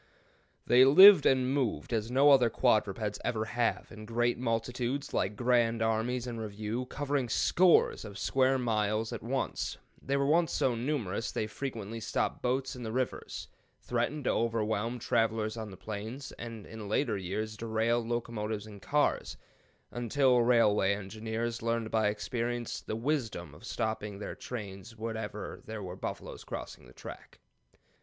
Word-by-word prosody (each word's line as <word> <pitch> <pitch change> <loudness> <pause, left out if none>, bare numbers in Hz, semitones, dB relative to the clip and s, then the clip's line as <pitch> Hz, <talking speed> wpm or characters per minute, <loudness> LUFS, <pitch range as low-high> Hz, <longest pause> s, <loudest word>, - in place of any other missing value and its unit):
They 125 +1 +7
lived 175 +5 +9
and 130 0 +3
moved 120 - -1
as 110 0 -1
no 140 +3 +5
other 125 -4 +6
quadrupeds 105 -3 +1
ever 110 -2 -1
have, 120 +1 -1
in 110 0 -10
great 120 +1 +1
multitudes, 125 +3 -2
like 100 +2 0
grand 115 -1 +2
armies 115 +3 0
in 120 -2 -5
review, 110 +3 -4
covering 140 -3 -1
scores 180 +9 +4
of 100 -3 -8
square 130 +4 +2
miles 110 -2 0
at 115 - -5
once. 130 +4 -2 0.2
They 140 +1 0
were 155 +5 +3
so 130 - +1
numerous 115 -4 -2
they 110 - -1
frequently 115 -2 -5
stopped 115 0 -1
boats 130 +2 -1
in 125 - -8
the 110 -2 -4
rivers, 130 +1 -3 0.3
threatened 125 +5 -2
to - - +2
overwhelm 115 0 0
travelers 115 -3 0
on 110 -2 -5
the 95 - -11
plains, 110 +7 -6
and 115 -3 -8
in 110 -2 -8
later 110 0 +1
years 100 +3 -3
derailed 115 +2 0
locomotives 110 -3 -3
and 105 -2 -11
cars, 150 0 0 0.5
until 125 +1 +2
railway 105 -5 +4
engineers 110 +4 -4
learned 115 -1 -1
by 110 -1 +2
experience 120 +2 -2
the - - -4
wisdom 115 - -2
of 75 - -15
stopping 105 -2 -3
their 105 - -5
trains 105 -1 -8
whenever 110 -2 -5
there 110 -2 -5
were 90 -1 -6
buffaloes 95 - -6
crossing - - -7
the - - -15
track. - - -11
115 Hz, 150 wpm, -31 LUFS, 110-125 Hz, 0.5 s, lived